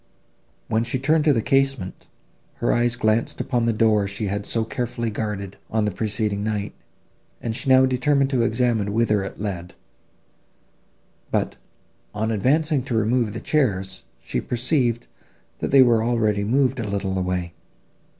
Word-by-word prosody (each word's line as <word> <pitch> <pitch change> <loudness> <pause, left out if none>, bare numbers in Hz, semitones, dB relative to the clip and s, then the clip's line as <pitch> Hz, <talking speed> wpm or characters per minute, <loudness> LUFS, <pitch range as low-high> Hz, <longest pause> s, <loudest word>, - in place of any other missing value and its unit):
When 115 0 +1
she 120 +2 -1
turned 150 +4 +2
from 150 -3 +4
the 115 - 0
casement, 135 -8 0 0.5
her - - 0
eyes 120 0 +2
glanced 110 -1 0
upon 120 -3 0
the - - +3
door 110 -2 +2
she 100 +2 -4
had 100 +1 -3
so 115 - +1
carefully 115 0 -3
guarded, 105 -2 -4
on 110 -1 0
the 105 - 0
preceding 105 0 -1
night, 105 -2 -2 0.7
and 115 -2 -3
she 135 +2 -3
now 130 0 +7
determined 135 +2 +1
to 130 -3 +2
examine 115 -3 +1
whither 110 -3 +2
it 95 - -7
led; 90 -4 -5 1.5
but, - - -1 0.6
on 110 +2 -1
advancing 145 - +2
to 125 - -2
remove 110 0 +1
the 115 - -4
chairs, 95 -11 -1 0.2
she - - -3
perceived, 120 -1 0 0.5
that - - -2
they 135 -1 +7
were 115 -3 +3
already 110 -3 +1
moved 130 +4 +1
a 110 - -3
little 100 -1 -2
way. 90 -1 -2
115 Hz, 155 wpm, -23 LUFS, 105-125 Hz, 1.5 s, now